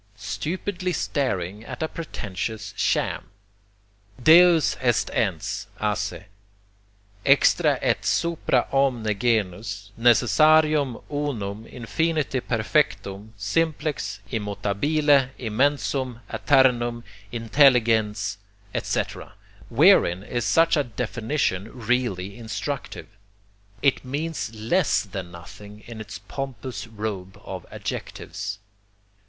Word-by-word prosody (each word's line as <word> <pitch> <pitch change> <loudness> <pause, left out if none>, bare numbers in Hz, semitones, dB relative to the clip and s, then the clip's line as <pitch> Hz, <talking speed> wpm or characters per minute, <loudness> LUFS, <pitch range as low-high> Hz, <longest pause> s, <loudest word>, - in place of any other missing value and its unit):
Stupidly 180 +2 -3
staring 105 - -2
at 160 - -6
a - - 0
pretentious 105 - -5
sham! - - 0 0.9
"Deus 170 0 +7
est 120 -3 +1
Ens, - - -1
a 105 -1 +1
se, 100 -1 -4 1.0
extra - - +4
et - - +1
supra 165 -7 +1
omne 135 -4 +2 0.2
genus, 105 -2 -1
necessarium, 135 +4 +4
unum, 115 -8 -3
infinite 145 +3 -1
perfectum, 110 -4 0
simplex, 145 -2 -1
immutabile, 130 +7 +1
immensum, 130 +1 0
aeternum, 120 -4 +3 0.3
intelligens," 115 -4 +3 0.4
etc., - - -3 0.4
wherein 90 +3 +5
is 120 +1 -3
such 165 0 +4
a 145 - +2
definition 115 -3 -2
really 120 -5 -2
instructive? 115 +5 -5 0.8
It 140 -2 +3
means 145 0 -3
less, 130 - +1
than 95 -4 -7
nothing, 100 +5 -12
in 115 -2 -8
its 105 -1 -8
pompous 115 0 -6
robe 105 -4 -5
of - - -7
adjectives. 95 0 -5
120 Hz, 90 wpm, -24 LUFS, 105-145 Hz, 1.0 s, Deus